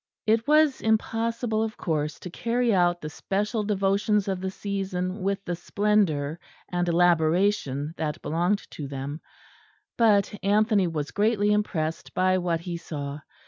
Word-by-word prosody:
It 225 +3 +2
was 305 -2 +4
impossible, 225 +1 0
of 220 -1 -3
course, 155 -2 -2
to 180 - -7
carry 235 +3 0
out 175 -2 +2
the 150 - -5
special 210 +6 -1
devotions 200 0 +1
of 190 -2 -2
the 190 - -2
season 190 -1 -3
with 195 +1 -1
the 175 - -2
splendour 175 -7 0 0.3
and 175 0 0
elaboration 170 -3 +2
that 155 +1 -2
belonged 175 +7 0
to 145 - -6
them; 140 +3 -5 0.8
but 210 -4 +4
Anthony 205 -1 +3
was 150 -3 -3
greatly 210 0 +2
impressed 165 -6 -2
by 185 0 +3
what 170 -2 -1
he 170 0 -4
saw. 145 -3 -6
190 Hz, 140 wpm, -26 LUFS, 165-210 Hz, 0.8 s, was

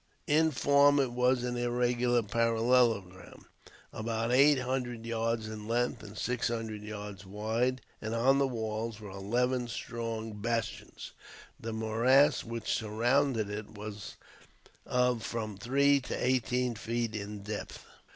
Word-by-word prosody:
In 160 +2 +4
form 145 0 +4
it 130 -3 +1
was 125 0 +2
an 125 0 -2
irregular 120 0 +1
parallelogram, 115 -4 +1 0.5
about 115 +1 -2
eight 140 +3 +6
hundred 125 -3 -3
yards 115 -1 -1
in 110 -1 -7
length 120 -1 0
and 105 0 -10
six 125 +1 -1
hundred 115 -2 -4
yards 105 -2 -7
wide, 110 +6 -1 0.2
and 110 +1 -3
on 135 +4 +4
the 140 - +3
walls 110 -2 -3
were 105 -2 -9
eleven 120 +6 0
strong 115 -2 -4
bastions. 115 -1 -3 0.5
The 115 - -5
morass 115 +6 +3
which 115 -1 -3
surrounded 115 +2 +1
it 105 +1 -6
was 105 -1 -7 0.7
of 125 -2 +2
from 110 -2 -4
three 140 +7 +3
to 125 - -5
eighteen 125 -1 +1
feet 115 0 -3
in 105 -1 -6
depth. 105 0 -6
115 Hz, 130 wpm, -31 LUFS, 110-125 Hz, 0.7 s, eight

